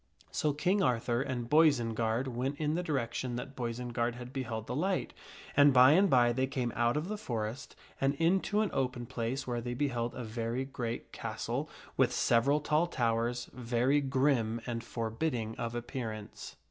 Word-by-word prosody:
So 150 - +1
King 180 +8 +1
Arthur 120 -5 +1
and 130 -3 -3
Boisenard 120 -5 +3
went 130 +3 -2
in 150 -1 0
the 175 - 0
direction 130 -5 -2
that 130 +3 -6
Boisenard 120 0 -2
lad 125 +1 -9
beheld 120 -5 -3
the 125 - -4
light, 185 +5 -1 0.4
and 145 0 +7
by 130 +1 +8
and 190 +5 +5
by 120 -3 +5
they 130 +2 0
came 125 -3 -2
out 120 +3 +2
of 155 +3 -2
the 210 +1 -4
forest 115 - -4 0.3
and 135 +1 +2
into 190 +6 +2
an 215 - 0
open 125 -2 -1
place 125 +1 -3
where 120 -1 -2
they 120 +1 -4
beheld 120 -4 -1
a 125 - -5
very 115 +3 -2
great 120 -4 -5
castle - - -3 0.3
with - - +4
several 140 +6 +3
tall 150 +3 +2
towers, 120 -2 0
very 125 +3 +1
grim 130 -4 +1
and 115 -1 -3
forbidding 115 0 -2
of 115 0 -3
appearance. 115 -3 -6
125 Hz, 170 wpm, -32 LUFS, 115-140 Hz, 0.4 s, by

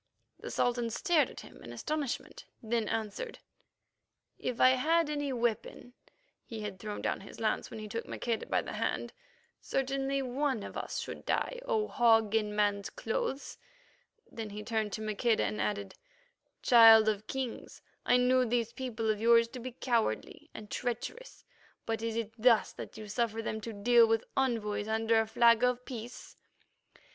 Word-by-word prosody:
The - - -7
Sultan 240 -1 0
stared 325 - +2
at - - -10
him - - -14
in - - -9
astonishment, 300 -4 -4 0.2
then 225 -1 0
answered: 225 - -3 1.0
"If 250 -2 -3
I 255 - +7
had 310 +4 +2
any 290 -2 -2
weapon 240 0 -2 0.5
(he 225 -2 -7
had 205 -2 -6
thrown 210 0 -6
down - - -1
his 200 - -12
lance 220 -1 -1
when - - -8
he 215 - -6
took 230 +3 -5
Maqueda 230 -2 -3
by - - +1
the - - -7
hand), - - -2 0.5
certainly 270 0 -1
one 260 -2 -1
of - - -8
us - - -4
should - - -6
die, - - 0
O 430 -3 0
Hog 225 -4 +3
in 210 -2 0
man's 205 -1 +1
clothes." 485 - -3 0.7
Then 225 -2 -7
he 210 +1 -7
turned 220 -2 -1
to 220 - -4
Maqueda 215 +2 +1
and 215 - -2
added, 200 -2 -2 0.7
"Child 225 -2 +8
of 215 0 0
Kings, 265 -3 -5 0.2
I 245 - +4
knew 255 +1 +4
these 235 -1 -1
people 240 -4 -4
of 215 -1 0
yours 230 0 +5
to 250 - -8
be 250 +1 -6
cowardly 235 -3 -1
and 210 -1 -10
treacherous, 255 - -5 0.4
but 225 -1 -2
is 230 -1 -2
it 225 -1 -3
thus 230 -1 +4
that - - -9
you 215 -1 -8
suffer 225 +1 -1
them 220 -1 -3
to 230 - -5
deal 230 +3 +5
with 225 0 +1
envoys 225 -6 0
under 225 +1 +2
a 220 - -3
flag 235 +1 +4
of 250 0 +1
peace?" 240 -2 -8
230 Hz, 170 wpm, -31 LUFS, 220-255 Hz, 1.0 s, Child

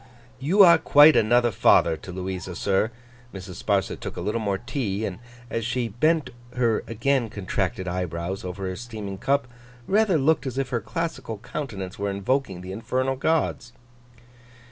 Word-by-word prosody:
'You 180 +10 +5
are 170 -3 +7
quite 150 +1 +7
another 120 +2 +4
father 85 -4 +4
to 80 +4 -10
Louisa, 95 0 -5
sir.' 100 +4 +1 0.5
Mrs. 95 -2 -8
Sparsit 100 -2 0
took - - -7
a - - -3
little 110 +2 -1
more 100 -2 0
tea; 110 -3 -3
and, 95 -1 -5 0.3
as 115 - -2
she 120 +1 -1
bent 145 +5 +1 0.2
her 120 -3 +1
again 120 +1 0
contracted 95 -1 -3
eyebrows 90 +1 -3
over 95 +1 -5
her 95 0 -3
steaming 105 -3 -7
cup, 140 +2 +1 0.4
rather 200 - +3
looked 150 0 +2
as 130 - -5
if 135 -2 -1
her 120 -2 -1
classical 130 -10 -4
countenance 100 -6 -6
were 100 0 -1
invoking 100 0 -1
the 90 +1 -7
infernal 130 +6 -1
gods. 135 -4 -1
115 Hz, 160 wpm, -25 LUFS, 95-135 Hz, 0.5 s, are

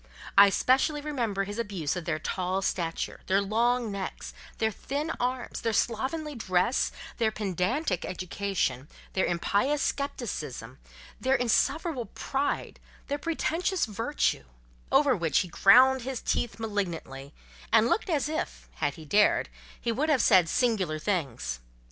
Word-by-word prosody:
I 200 0 +9
specially 265 +8 +2
remember 240 -10 -2
his 205 +3 -6
abuse 190 -10 -2
of 180 -2 -5
their 165 -3 0
tall 185 +4 -2
stature, 170 -3 -2
their 190 +1 +3
long 230 +3 +1
necks, 195 -1 -5 0.2
their 220 -1 +1
thin 290 +8 -3
arms, 250 +1 -2
their 225 - 0
slovenly 275 +9 -1
dress, 220 0 +1 0.3
their 225 -2 +2
pedantic 200 - -1
education, 180 -7 -2 0.3
their 190 - +1
impious 205 +11 +1
scepticism(!), 240 - -4 0.4
their 260 +1 +2
insufferable 250 +3 +1
pride, 275 +1 -3 0.3
their 285 +1 -1
pretentious 335 +3 0
virtue: 225 - -1 0.5
over 270 -1 +5
which 170 -5 +2
he 180 - -5
ground 255 +9 +6
his 255 0 -4
teeth 240 - -1
malignantly, 170 -11 -4 0.4
and 225 0 +5
looked 425 - 0
as 295 -4 +1
if, 310 +1 -4
had - - -1
he 160 -3 -11
dared, 205 +8 +3 0.3
he 235 - -1
would 285 +7 0
have 280 -5 +3
said 185 -5 +5
singular 215 -11 +1
things. 155 - -2
220 Hz, 135 wpm, -28 LUFS, 185-265 Hz, 0.5 s, I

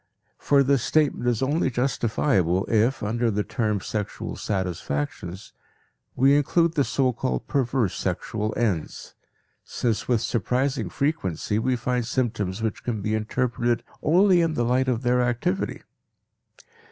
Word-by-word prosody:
For 140 -1 +4
this 135 -1 +2
statement 145 -3 +1
is 120 +1 0
only 145 +2 +1
justifiable 115 - +1
if, 115 +4 +1
under 115 +3 0
the 105 -1 0
term 105 -4 -1
"sexual 105 0 -4
satisfactions," 90 -1 -4 0.6
we 135 +2 +5
include 165 +3 +2
the 145 -4 +2
so 130 -1 +1
called 65 - -2
perverse 125 -6 0
sexual 105 +3 -2
ends, 100 -10 -2 0.5
since 115 -3 -2
with 120 -3 +2
surprising 125 +2 -1
frequency 110 - -1
we 130 +3 +1
find 125 -1 -1
symptoms 110 -5 -1
which 110 -2 -2
can 110 -5 -3
be 105 - -1
interpreted 120 +2 0 0.2
only 180 +3 +4
in 165 -2 0
the 120 - +1
light 130 +2 +2
of 125 -1 0
their 125 +1 +3
activity. 125 - -1
120 Hz, 135 wpm, -25 LUFS, 105-135 Hz, 0.6 s, we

